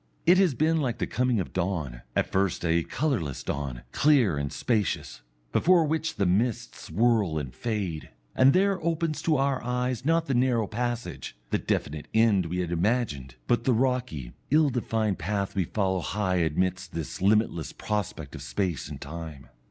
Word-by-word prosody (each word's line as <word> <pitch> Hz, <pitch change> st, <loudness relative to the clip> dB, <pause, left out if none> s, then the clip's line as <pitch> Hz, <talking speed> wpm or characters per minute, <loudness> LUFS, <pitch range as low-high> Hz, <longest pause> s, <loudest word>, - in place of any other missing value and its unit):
It 180 Hz, +2 st, +6 dB
has 180 Hz, -9 st, +3 dB
been 160 Hz, +3 st, +2 dB
like 125 Hz, -4 st, -1 dB
the -, -, -1 dB
coming 125 Hz, -3 st, +1 dB
of 95 Hz, -, -4 dB
dawn, 85 Hz, -10 st, -2 dB
at -, -, 0 dB
first 95 Hz, -2 st, 0 dB
a 85 Hz, 0 st, +3 dB
colourless 100 Hz, -, -2 dB
dawn, 70 Hz, -4 st, -4 dB
clear 140 Hz, -, +4 dB
and 70 Hz, 0 st, -2 dB
spacious, 105 Hz, -, -1 dB, 0.3 s
before 175 Hz, -2 st, +4 dB
which 160 Hz, +1 st, -1 dB
the 100 Hz, -, +1 dB
mists 105 Hz, +6 st, -1 dB
whirl 110 Hz, -8 st, +2 dB
and 65 Hz, -5 st, -4 dB
fade, 95 Hz, -, -3 dB, 0.3 s
and 130 Hz, +1 st, +6 dB
there 190 Hz, +1 st, +2 dB
opens 165 Hz, -1 st, -1 dB
to 155 Hz, -3 st, +2 dB
our 135 Hz, -2 st, 0 dB
eyes 125 Hz, 0 st, -1 dB
not 165 Hz, +3 st, +2 dB
the 140 Hz, -, -1 dB
narrow 120 Hz, -3 st, +2 dB
passage, 120 Hz, -, -4 dB
the -, -, +2 dB
definite 75 Hz, 0 st, -2 dB
end 110 Hz, -6 st, +4 dB
we 90 Hz, +2 st, -2 dB
had 85 Hz, -1 st, -3 dB
imagined, 85 Hz, -, -1 dB
but 120 Hz, -, +1 dB
the 130 Hz, -, +3 dB
rocky, 125 Hz, -, -1 dB, 0.2 s
ill 150 Hz, 0 st, +4 dB
defined 110 Hz, -5 st, -1 dB
path 100 Hz, +3 st, -2 dB
we 95 Hz, -3 st, +1 dB
follow 95 Hz, 0 st, 0 dB
high 95 Hz, 0 st, -1 dB
amidst 90 Hz, +2 st, 0 dB
this 80 Hz, +1 st, -5 dB
limitless 100 Hz, -6 st, +2 dB
prospect 105 Hz, -3 st, -4 dB
of -, -, -8 dB
space 90 Hz, -7 st, -2 dB
and -, -, -8 dB
time. 75 Hz, -3 st, -8 dB
105 Hz, 170 wpm, -27 LUFS, 85-130 Hz, 0.3 s, It